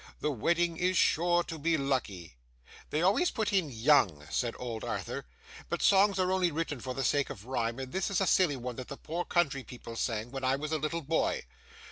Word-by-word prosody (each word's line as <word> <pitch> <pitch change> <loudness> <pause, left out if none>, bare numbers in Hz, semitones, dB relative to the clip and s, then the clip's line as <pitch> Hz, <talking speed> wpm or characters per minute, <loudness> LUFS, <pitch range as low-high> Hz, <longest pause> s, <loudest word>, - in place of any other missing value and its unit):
The 150 - 0
wedding 170 +6 +1
is 180 +1 +1
sure 175 +1 +3
to 165 -2 -7
be 165 +2 +2
lucky! 110 - -2 0.5
'They 155 +3 0
always 210 - +3
put 220 -3 -2
in 185 -6 +2
"young,"' 110 - +3
said 120 -2 -1
old 115 -3 -5
Arthur, - - -4 0.4
'but - - -2
songs 195 0 +5
are 185 0 +1
only 185 -2 +2
written 155 -3 -3
for 130 +1 -5
the 135 - -1
sake 140 +2 +1
of 100 - -8
rhyme, 120 -2 -1
and 130 -1 -6
this 190 0 -1
is 200 - +1
a 195 - +2
silly 175 -4 +3
one 125 -1 -5
that 130 - -6
the 140 - -7
poor 170 +3 -3
country 150 -6 +1
people 120 -2 -9
sang, 115 0 -2
when 135 -1 -5
I 130 +1 +3
was 150 +2 -4
a 155 - 0
little 155 +2 -2
boy. 160 +3 0
145 Hz, 215 wpm, -30 LUFS, 125-175 Hz, 0.5 s, songs